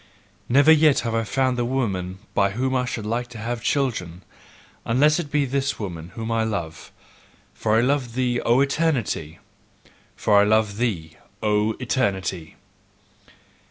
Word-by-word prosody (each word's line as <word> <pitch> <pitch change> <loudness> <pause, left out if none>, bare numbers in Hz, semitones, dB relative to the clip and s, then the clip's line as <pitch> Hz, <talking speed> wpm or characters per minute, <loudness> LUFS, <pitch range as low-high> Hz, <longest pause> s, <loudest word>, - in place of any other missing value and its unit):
Never 140 +5 +6
yet 155 -2 +5
have 115 -2 -3
I 115 0 +1
found 130 +3 0
the - - +1
woman 100 -8 -2 0.2
by 100 0 +2
whom 130 +4 -1
I 125 -1 +1
should 120 -4 -4
like 120 +3 -2
to 120 -1 -11
have 115 +2 -4
children, 95 - -1 0.6
unless 150 +7 +3
it 160 -4 -4
be 145 -1 +1
this 135 +1 -1
woman 85 -5 -6
whom 115 0 -4
I 115 -1 +1
love: 85 -7 -4 0.6
for 110 0 +1
I - - +4
love 125 -2 0
thee, 125 -1 0
O 120 +3 +3
Eternity! 135 - -1 0.8
FOR 100 -1 +4
I - - +5
LOVE 105 -1 +2
THEE, 90 -10 -2 0.3
O 105 +1 +2
ETERNITY! 95 -10 -2
115 Hz, 155 wpm, -23 LUFS, 100-130 Hz, 0.8 s, Never